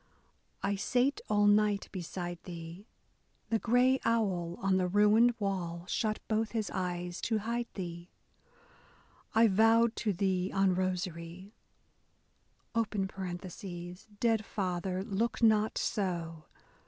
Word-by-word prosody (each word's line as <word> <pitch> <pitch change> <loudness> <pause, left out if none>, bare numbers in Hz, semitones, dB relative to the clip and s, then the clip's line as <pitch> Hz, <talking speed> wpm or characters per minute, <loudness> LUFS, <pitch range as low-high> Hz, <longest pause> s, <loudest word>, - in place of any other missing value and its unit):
I 200 0 0
sate 255 +7 +1
all 205 -1 +3
night 205 -1 +3
beside 175 -1 -5
thee— 170 +3 -8 0.6
The 225 - +2
gray 250 +3 +3
owl 185 -7 0
on 195 -1 +2
the 185 -1 +1
ruined 210 +5 +5
wall 180 -4 -3
shut 215 +3 0
both 220 0 0
his 220 -3 -2
eyes 180 -1 -3
to 225 - 0
hide 235 +3 -2
thee 175 -2 -6 1.3
I 225 +1 +7
vowed 225 +3 +4
to 215 - 0
thee 190 -1 0
on 195 -1 +3
rosary 180 +1 -3 1.2
(dead 195 +1 -3
father, 185 -2 -2
look 220 +4 -1
not 215 -1 +4
so 170 -5 -2
195 Hz, 110 wpm, -31 LUFS, 180-220 Hz, 1.3 s, I